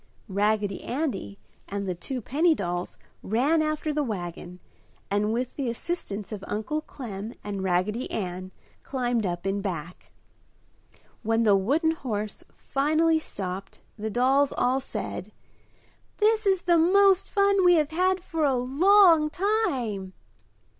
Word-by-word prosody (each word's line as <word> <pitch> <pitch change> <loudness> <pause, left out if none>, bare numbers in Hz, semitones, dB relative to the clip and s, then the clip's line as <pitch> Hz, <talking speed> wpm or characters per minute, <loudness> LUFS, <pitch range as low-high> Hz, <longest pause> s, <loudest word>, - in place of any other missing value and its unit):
Raggedy 205 0 0
Andy 245 - -3 0.3
and 200 0 -4
the 185 - 0
two 250 +9 -5
penny 315 +8 +2
dolls 175 -4 -3 0.2
ran 275 +10 +2
after 310 0 -1
the 300 - 0
wagon 180 - -5 0.5
and, 205 +1 +1
with 245 +2 -2
the 270 -4 -2
assistance 230 - -4
of 205 -2 -6
Uncle 220 +9 -2
Clem 225 -7 -7
and 200 -2 -4
Raggedy 190 +6 0
Ann, 185 -2 -4 0.3
climbed 245 -5 -1
up 175 0 -4
in 195 +1 -1
back. 180 -2 -6 1.1
When 225 0 +1
the 210 -3 +5
wooden 285 - +2
horse 215 -9 -4
finally 315 +3 +2
stopped 195 -8 -6
the 220 +1 -4
dolls 265 +5 +3
all 255 +2 +2
said, 215 -5 -6 0.9
"This 435 0 +2
is 380 -2 +2
the 345 -1 +4
most 385 +3 +4
fun 400 -1 +3
we 355 -1 +6
have 305 -2 +1
had 370 +3 +1
for 325 -3 -2
a 275 -3 +3
long 325 +5 +5
time!" 270 - -1
245 Hz, 135 wpm, -26 LUFS, 200-320 Hz, 1.1 s, we